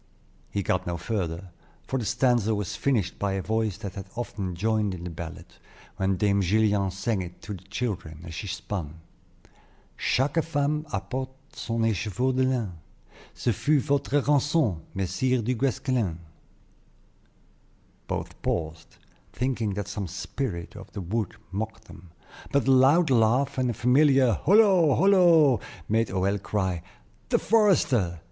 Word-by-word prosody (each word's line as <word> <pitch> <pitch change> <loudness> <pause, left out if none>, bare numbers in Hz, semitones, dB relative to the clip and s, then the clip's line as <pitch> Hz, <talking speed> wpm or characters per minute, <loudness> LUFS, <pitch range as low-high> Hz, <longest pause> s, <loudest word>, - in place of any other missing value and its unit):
He 100 - -2
got 90 0 0
no 85 0 -2
further, 90 -2 -3 0.3
for 130 - -2
the 110 - -3
stanza 120 -4 +2
was 100 -3 -3
finished 110 -10 0
by 100 -1 0
a 95 - -1
voice 110 -2 -1
that 100 -3 -6
had 95 0 -7
often 100 -6 -4
joined 105 0 0
in 85 - -9
the 90 - -5
ballad, 85 +1 -7 0.5
when 95 -1 +1
Dame 100 0 +2
Gillian 100 +1 +2
sang 100 +2 -1
it 90 -1 -8
to 105 - -5
the 95 - -8
children, 95 -8 -4
as 80 - -8
she 100 - -5
spun: 85 -4 -5 1.0
"Chaque 140 +5 +1
femme 150 0 -1
apporte 130 +1 -5
son 115 0 -2
écheveau 115 +4 0
de 130 - +2
lin; 125 -6 0 0.6
Ce 120 - 0
fut 150 +8 +2
votre 140 0 +1
rançon, 145 - +2 0.2
Messire 105 +7 0
du 125 +4 0
Guesclin." 125 - 0 1.9
Both - - -5
paused, 80 -1 -3 0.4
thinking 120 -6 -1
that 105 -2 -3
some 100 -3 -4
spirit 95 0 -5
of 100 -1 -11
the 100 - -5
wood 100 +3 -2 0.2
mocked 110 +3 -4
them; 85 +1 -14 0.4
but 140 -2 +1
a - - +5
loud 135 +5 +5
laugh, 125 +3 +3
and 125 -1 +1
a - - 0
familiar 135 0 +4
"Holo! 185 - +4
holo!" 170 - +5 0.3
made 115 +1 +2
Hoël 95 +1 0
cry, 95 -4 -1 0.5
"The - - +4
forester!" 140 - +2
110 Hz, 145 wpm, -26 LUFS, 95-130 Hz, 1.9 s, a